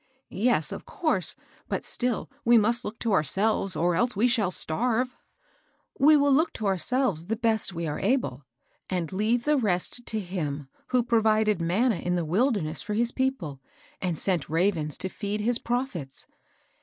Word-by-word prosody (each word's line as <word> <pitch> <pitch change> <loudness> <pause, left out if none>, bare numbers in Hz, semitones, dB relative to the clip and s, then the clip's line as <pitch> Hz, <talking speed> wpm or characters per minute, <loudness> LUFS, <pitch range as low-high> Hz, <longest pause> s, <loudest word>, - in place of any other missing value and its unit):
" - - -57 0.2
Yes, 160 -11 +2
of - - -6
course; 200 - -1 0.3
but - - -2
still 245 -2 +1 0.2
we 235 0 +6
must 230 +3 +3
look 215 +2 -6
to 230 - -2
ouj^ 155 -8 +2
selves, 195 -2 0
or 175 +2 +1
else 240 +7 +1
we 220 +5 +3
shall 220 -6 +1
starve." 245 +9 +1 0.4
" - - -36
We 300 +2 +7
will 285 0 +3
look 315 +5 +3
to 215 - -5
ourselves 195 - +1
the 225 - 0
best 220 -5 +1
we 170 0 -3
are 150 -1 -3
able, 200 - 0 0.5
and 180 -2 -2
leave 225 +5 0
the 300 0 +3
rest 215 +1 0
to 220 - -1
Him 150 -8 -4 0.2
who 250 -1 +2
provided 220 -4 +2
manna 195 +6 +1
in 180 +1 -2
the 175 -2 -1
wilderness 195 - 0
for 210 0 -4
his 235 +2 +1
people, 235 - -2 0.4
and 180 -4 -1
sent 180 -4 0
ravens 160 -3 0
to - - -3
feed 205 +2 -4
his 240 +3 +2
prophets." 235 - -3
210 Hz, 180 wpm, -26 LUFS, 175-245 Hz, 0.5 s, We